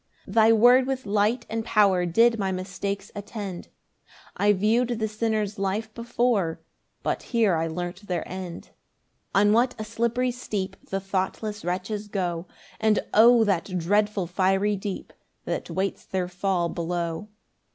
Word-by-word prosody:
8 190 Hz, -, -8 dB
Thy 225 Hz, 0 st, +6 dB
word 245 Hz, +3 st, +6 dB
with 265 Hz, -2 st, -2 dB
light 210 Hz, +4 st, +1 dB
and 225 Hz, 0 st, -3 dB
power 195 Hz, -5 st, +3 dB
Did 230 Hz, +6 st, +4 dB
my 195 Hz, -1 st, 0 dB
mistakes 195 Hz, +2 st, -4 dB
attend; 205 Hz, -3 st, -6 dB, 0.7 s
I 205 Hz, +1 st, +3 dB
view'd 230 Hz, +4 st, +2 dB
the 220 Hz, -1 st, 0 dB
sinners' 215 Hz, -2 st, -1 dB
life 210 Hz, +3 st, -2 dB
before, 235 Hz, -7 st, 0 dB, 0.4 s
But -, -, -1 dB
here 225 Hz, -7 st, +2 dB
I 165 Hz, 0 st, 0 dB
learnt 175 Hz, +4 st, -5 dB
their 175 Hz, -2 st, -2 dB
end. 185 Hz, -2 st, -7 dB, 0.6 s
9 200 Hz, +1 st, +5 dB
On -, -, +4 dB
what 245 Hz, +2 st, +3 dB
a 215 Hz, -, -4 dB
slippery 235 Hz, +3 st, 0 dB
steep 200 Hz, -6 st, -4 dB
The 195 Hz, -, -1 dB
thoughtless 195 Hz, +2 st, -3 dB
wretches 195 Hz, +4 st, -3 dB
go; 180 Hz, -4 st, -2 dB, 0.3 s
And 220 Hz, -1 st, +2 dB
O 230 Hz, +1 st, +7 dB
that 185 Hz, -2 st, 0 dB
dreadful 205 Hz, +2 st, +1 dB
fiery 195 Hz, +3 st, +1 dB
deep 195 Hz, 0 st, -6 dB, 0.3 s
That -, -, -3 dB
waits 190 Hz, +1 st, -2 dB
their 185 Hz, -2 st, -2 dB
fall 180 Hz, -1 st, 0 dB
below. 170 Hz, +2 st, -3 dB
205 Hz, 150 wpm, -25 LUFS, 185-220 Hz, 0.7 s, O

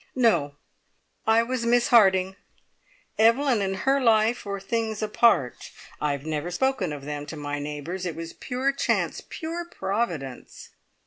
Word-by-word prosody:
"No! 220 Hz, -, +2 dB, 0.7 s
I 225 Hz, +1 st, +5 dB
was 250 Hz, 0 st, -2 dB
Miss 240 Hz, +1 st, +3 dB
Harding. 190 Hz, -5 st, +5 dB, 0.8 s
Evelyn 230 Hz, +1 st, +4 dB
and 195 Hz, -1 st, -1 dB
her 270 Hz, +8 st, +1 dB
life 225 Hz, -1 st, +3 dB
were 200 Hz, -1 st, -3 dB
things 220 Hz, +1 st, -2 dB
apart. 210 Hz, -, +2 dB, 0.3 s
I 150 Hz, -, +1 dB
have 140 Hz, +1 st, -6 dB
never 155 Hz, +1 st, -2 dB
spoken 205 Hz, -, 0 dB
of 145 Hz, -2 st, -7 dB
them 145 Hz, 0 st, -5 dB
to 160 Hz, -, -6 dB
my 145 Hz, 0 st, -4 dB
neighbours. 150 Hz, +6 st, -5 dB
It 165 Hz, -, -4 dB
was 165 Hz, 0 st, -7 dB
pure 260 Hz, +2 st, -1 dB
chance 275 Hz, -, -1 dB
pure 335 Hz, +1 st, -4 dB
Providence!" 190 Hz, -, -4 dB
200 Hz, 145 wpm, -25 LUFS, 155-235 Hz, 0.8 s, I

